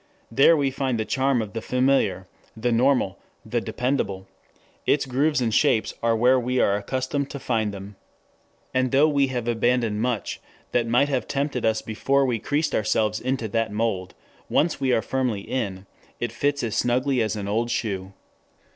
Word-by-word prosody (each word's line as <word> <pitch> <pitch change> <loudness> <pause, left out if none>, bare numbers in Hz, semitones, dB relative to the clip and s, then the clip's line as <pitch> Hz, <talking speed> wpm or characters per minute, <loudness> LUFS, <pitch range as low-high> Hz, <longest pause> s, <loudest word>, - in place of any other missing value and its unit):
There 140 +7 +5
we 140 -2 +1
find 130 -3 -1
the 110 - -1
charm 130 -2 +1
of 100 -3 -9
the 115 - -3
familiar, 125 -8 +1 0.3
the 120 +2 0
normal, 120 -5 +2 0.3
the - - -1
dependable; 125 -7 -2 0.6
its 140 - +3
grooves 140 +2 +1
and 115 -3 0
shapes 125 -5 +2
are 115 -1 +2
where 125 +3 +4
we 125 +1 -1
are 100 - +3
accustomed 130 +6 -2
to 140 - -6
find 110 -5 0
them. 100 0 -9 0.8
And 130 0 +2
though 140 +3 +5
we 140 -2 +2
have 125 -3 -3
abandoned 120 -2 +1
much 120 -4 -2 0.3
that 120 -1 +1
might 125 +5 +3
have 130 -3 -1
tempted 140 -3 -1
us 110 0 0
before 135 +5 +1
we 120 -3 0
creased 145 +7 -1
ourselves 110 0 +1
into 130 -3 -2
that 115 0 0
mould, 105 -4 -2 0.3
once 155 -2 +1
we 130 -1 +2
are 115 - +2
firmly 125 -6 -1
in, 100 -5 -4 0.3
it 120 -1 -2
fits 140 +4 -1
as 115 -3 -2
snugly 125 +1 +1
as 110 0 0
an 100 -2 -4
old 115 +3 0
shoe. 95 -5 -3
120 Hz, 175 wpm, -24 LUFS, 110-135 Hz, 0.8 s, There